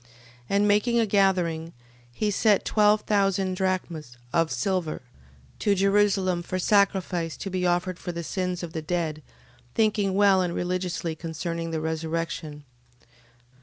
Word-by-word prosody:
12:43. 125 - -26 0.4
And 200 +1 +3
making 210 +4 +3
a 230 - +3
gathering, 180 -5 +1 0.4
he 210 - -1
sent 205 0 +3
twelve 210 0 +4
thousand 195 -3 +1
drachms 175 -8 -3 0.2
of 165 -1 +2
silver 185 -9 -1 0.6
to 205 - +2
Jerusalem 195 -2 +2
for 185 +2 -4
sacrifice 185 -4 +1
to 195 - -5
be 180 -1 0
offered 175 0 0
for 175 - -4
the 170 0 -5
sins 180 0 -3
of 170 -1 -6
the 160 - -3
dead, 155 -1 -2 0.5
thinking 210 -3 +2
well 200 -2 +5
and 175 -1 -1
religiously 175 -2 -2
concerning 165 +1 -4
the 160 -1 -2
resurrection. 160 -1 -3
180 Hz, 140 wpm, -26 LUFS, 165-200 Hz, 0.6 s, well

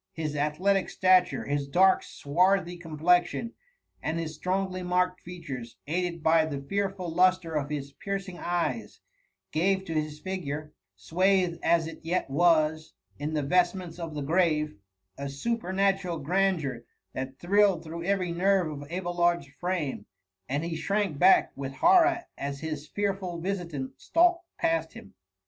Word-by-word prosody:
His 155 -2 -3
athletic 175 +7 +1
stature, 185 -1 +3
his 145 0 -1
dark 190 +6 +4
swarthy 180 +4 +1
complexion, 175 +7 +1 0.5
and 160 - -2
his 160 -2 -3
strongly 185 +3 -2
marked 180 0 0
features, 145 -10 -8
aided 170 +1 -2
by 160 0 +5
the 145 -3 -4
fearful 195 +5 -2
lustre 180 0 +2
of 145 -2 -1
his 140 -2 -4
piero^ 195 0 -3
ing 175 -2 -8
eyes, 175 +6 -2 0.5
gave 190 +4 +1
to 165 - -4
his 155 -1 -2
figure, 155 -5 -5 0.2
swathed 180 - +1
as 170 -1 +3
it 165 - -8
yet 165 -3 -2
was 155 0 +2 0.3
in 150 +2 -3
the 150 - 0
vestments 180 +2 +1
of 165 -3 -5
the 145 - -3
grave, 155 -1 +2 0.5
a 140 - -4
superna 195 +5 0
tural 175 -5 -5
grandeur 165 -7 0 0.3
that 130 0 -5
thrilled 195 -1 +3
through 165 +1 -6
every 185 -1 0
nerve 185 -1 +2
of 145 0 -8
Abelard's 175 -2 0
frame, 170 - -2 0.4
and 140 +4 -1
he 170 -1 -3
shrank 195 -3 -1
back 190 +1 +6
with 135 0 -5
horror 350 - +5 0.2
as 140 0 -4
his 155 -2 -5
fearful 195 -2 -2
visitant 170 -7 -4
stalked 350 +1 +3
past 165 0 0
him. 95 - -12
170 Hz, 145 wpm, -28 LUFS, 150-185 Hz, 0.5 s, back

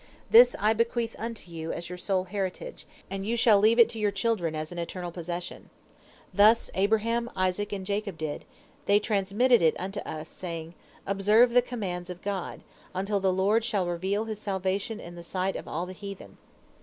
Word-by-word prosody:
This 245 +2 +8
I 215 +2 +3
bequeath 230 0 -1
unto 225 -5 -6
you 165 -1 -5
as 170 - -5
your 180 - -7
sole 190 0 0
heritage, 195 - -5 0.2
and 195 0 -3
you 230 +4 -1
shall 220 -3 +5
leave 220 +3 +4
it 235 - +8
to 230 -1 -6
your 210 -1 +2
children 200 -6 -1
as 155 +1 -4
an 175 - -6
eternal 175 +1 -5
possession. 175 +1 -6 0.6
Thus 215 +3 +5
Abraham, 225 +4 +1
Isaac, 185 +2 0
and 195 -2 -4
Jacob 200 -2 -3
did, 155 -2 -4 0.4
they 200 - +6
transmitted 210 +4 +2
it 160 -2 +4
unto 195 +2 -4
us, 155 -4 -6
saying, 165 -2 -7 0.3
'Observe 210 +5 +4
the 245 - +6
commands 190 -8 -5
of 180 0 -8
God, 195 -3 -4 0.3
until 200 +2 0
the 190 -1 +2
Lord 200 +5 +2
shall 205 -5 0
reveal 190 +5 -1
His 215 -1 -6
salvation 200 +2 -2
in 175 - -9
the 170 0 -10
sight 185 +2 -2
of - - -6
all 170 +3 -3
the 185 - -8
heathen.' 200 0 -9
200 Hz, 185 wpm, -28 LUFS, 180-220 Hz, 0.6 s, This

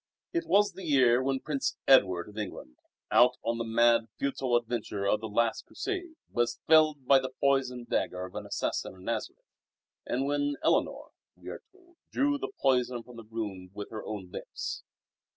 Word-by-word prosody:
It 340 - -1
was 205 +1 +4
the 190 - -9
year 130 -6 +4
when 135 0 -1
Prince 140 -3 -2
Edward 95 -10 +5
of 105 - -13
England, 95 - -6 0.3
out 125 +1 +5
on 115 0 -1
the - - 0
mad, 115 0 +3
futile 135 -3 0
adventure 115 -4 -1
of 105 +2 +2
the 110 - -5
last 115 +2 0
Crusade, 370 -4 -4 0.2
was 120 0 0
felled 155 -3 +5
by 135 +1 +6
the 130 0 -4
poisoned 130 -3 +1
dagger 90 0 -1
of 95 - -11
an - - -6
assassin - - -2
in 95 - -15
Nazareth, - - -4 0.6
and 130 +2 0
when 145 0 0
Eleanor - - +1 0.2
(we - - -10
are - - -7
told) 355 -3 -25
drew 285 +1 +1
the - - -4
poison 125 -2 +1
from 125 0 -14
the 115 - -8
wound 105 -5 -5
with 105 - -7
her 110 - -6
own 95 -4 -6
lips. - - -5
125 Hz, 180 wpm, -29 LUFS, 110-140 Hz, 0.6 s, by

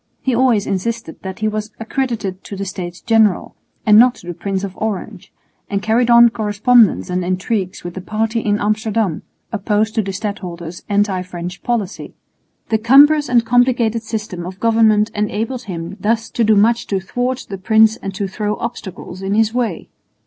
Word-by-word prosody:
He 260 - -1
always 235 -4 +2
insisted 225 -1 -3
that 190 -1 -6
he 215 - +1
was 215 0 -3
accredited 225 -5 -3
to 200 - -7
the 195 +1 -4
States 180 -2 -6
General 220 -4 +2 0.3
and 210 0 +7
not 245 +1 +5
to - - -15
the 175 - -5
Prince 195 +2 -3
of 190 -2 -5
Orange, 210 -2 -5 0.4
and 200 - 0
carried 230 +2 +2
on 235 0 +8
correspondence 220 -1 +2
and 180 0 -1
intrigues 185 +1 -2
with 175 0 -6
the 190 - -6
party 220 +4 -1
in 210 -1 0
Amsterdam 215 -3 -1 0.3
opposed 215 +1 0
to 220 - +1
the 195 -1 -4
stadholder's 180 -4 -6
anti 200 -2 +1
French 180 0 -7
policy. 220 -5 -3 0.5
The 220 - +2
cumbrous 285 +5 +5
and 240 -2 +3
complicated 240 -2 +2
system 215 -5 -5
of 185 +2 -8
government 220 -2 +3
enabled 220 +4 -2
him 175 -1 -6
thus 225 +3 -1
to 235 - 0
do 220 0 +4
much 230 +3 +3
to 195 - 0
thwart 245 +6 -3
the 195 -1 -6
prince 220 +2 +4
and 195 - -5
to 195 +1 -2
throw 210 +2 -2
obstacles 190 -5 -7
in 195 +1 -1
his 220 0 +2
way. 245 -2 -2
215 Hz, 180 wpm, -18 LUFS, 190-230 Hz, 0.5 s, on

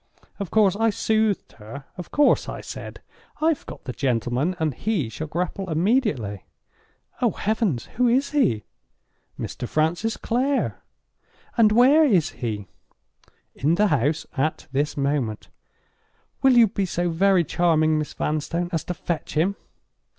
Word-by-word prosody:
Of 200 -4 -4
course 205 -4 +3
I 225 +2 +2
soothed 220 -1 0
her. 135 +7 -9
Of 180 - -8
course 295 0 +3
I - - -5
said: - - -8 0.4
'I've 315 -1 +1
got - - -9
the 125 - -5
gentleman, 125 +6 0
and 160 -4 0
he 180 - -1
shall 155 +8 -6
grapple 180 +4 -3
immediately.'—'Oh 165 - -2
heavens! 205 - -1
who 250 0 +4
is 265 +4 +2
he?'—'Mr. 110 - -4
Francis 170 +9 0
Clare.'—'And 260 - -2
where 260 +8 +6
is 195 - +3
he?'—'In 115 - -5
the 210 +3 +3
house 150 +2 +1
at 155 +3 -1
this 145 +3 -1
moment.'—'Will 140 - -3
you 230 -2 +7
be 195 -1 -2
so 175 0 -1
very 185 +1 +3
charming, 155 -1 +2
Miss 150 - -4
Vanstone, 165 +3 -2
as 165 -2 0
to 180 - -4
fetch 170 -3 -4
him? 180 +6 +2
175 Hz, 130 wpm, -24 LUFS, 145-220 Hz, 0.4 s, you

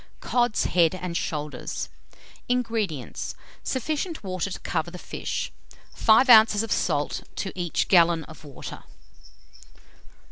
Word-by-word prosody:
COD'S 240 -3 +1
HEAD 170 -1 +3
AND 180 -2 -5
SHOULDERS. 150 -3 -3 0.6
232. - - +4
INGREDIENTS. 220 - -3 0.3
Sufficient 310 - -2
water 185 0 -2
to - - -6
cover 165 0 -2
the 180 - -9
fish; - - -4 0.4
5 220 +4 +5
oz. 220 -3 +7
of 225 - -6
salt 145 -4 0
to 195 - -3
each 175 -3 -1
gallon 170 -3 +5
of 160 +1 -13
water. 145 -3 -9
185 Hz, 120 wpm, -25 LUFS, 165-225 Hz, 0.6 s, oz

